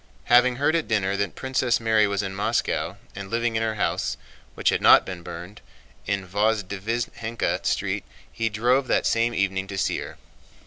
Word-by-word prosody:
Having 125 0 +6
heard 145 +5 +1
at 165 - 0
dinner 100 -3 +1
that 100 -2 -2
Princess 130 -2 0
Mary 110 -2 +3
was 100 0 -1
in 95 0 -4
Moscow 100 +1 -1 0.2
and 100 -1 -7
living 115 +1 0
in 110 - +1
her 110 -1 -1
house—which 105 - -2
had - - 0
not - - +7
been 90 -2 -6
burned—in 95 +2 -7
Vozdvízhenka 110 +3 -1
Street, - - -1 0.3
he 115 0 -1
drove 125 +5 +1
that - - +1
same 115 +1 +1
evening 95 0 0
to 100 0 -6
see - - 0
her. - - -8
110 Hz, 165 wpm, -24 LUFS, 100-120 Hz, 0.3 s, not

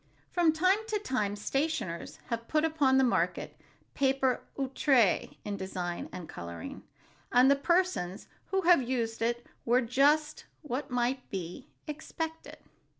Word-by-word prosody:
From 345 -3 +4
time 370 +6 +3
to 435 -1 0
time, 215 - -1
stationers 210 - -2
have 230 0 -2
put 310 0 +2
upon 290 -5 +3
the 265 - +5
market 245 - 0 0.4
paper 270 -2 +2 0.2
outré 265 -5 +2
in 205 -1 -3
design 180 -2 -4
and 175 -3 -7
coloring, 85 -1 -7 0.5
and 255 +2 +6
the - - +6
persons 340 - 0 0.2
who 385 0 +1
have 345 -4 +6
used 235 -3 -2
it 240 +1 0 0.2
were 245 +2 +3
just 290 +5 +2 0.2
what 280 0 -3
might 250 +1 -1
be 190 - -6 0.2
expected. 320 +1 -6
265 Hz, 135 wpm, -30 LUFS, 225-310 Hz, 0.5 s, and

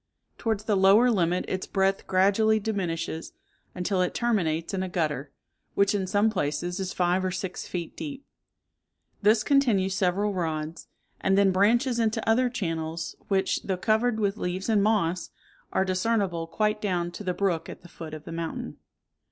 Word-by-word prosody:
Towards 220 -3 -1
the 215 -1 +1
lower 200 +6 +6
limit 180 -3 +1
its 185 0 -3
breadth 195 0 0
gradually 205 +4 +3
diminishes, 180 -6 -3 0.4
until 185 +1 0
it 180 - -1
terminates 170 -10 0
in 190 - -1
a 185 - -3
gutter, 150 -5 -2 0.4
which 200 +1 +3
in 195 -2 -1
some 205 +3 +2
places 175 0 -2
is 190 -1 -3
five 180 +1 +1
or 185 - 0
six 185 0 -5
feet 175 -2 -5
deep; 280 -2 -7 1.0
this 215 +1 +4
continues 230 -10 +3
several 195 +2 +1
rods, 160 -3 -3 0.3
and 190 0 +2
then 200 -1 +5
branches 235 +6 +3
into 220 -1 0
other 245 +3 +3
channels, 165 -7 -3
which, 195 -1 +1
though 190 -2 -2
covered 220 +4 +1
with 200 0 0
leaves 185 +2 -3
and 215 -2 +4
moss, 190 -5 +1 0.4
are 190 - +1
discernible 185 -3 0
quite 210 +4 0
down 175 -4 -1
to 190 - -8
the 180 -2 -2
brook 175 -5 0
at - - -9
the - - -12
foot 160 -2 -8
of 155 - -10
the 165 - -9
mountain. 165 0 -5
190 Hz, 170 wpm, -27 LUFS, 175-215 Hz, 1.0 s, lower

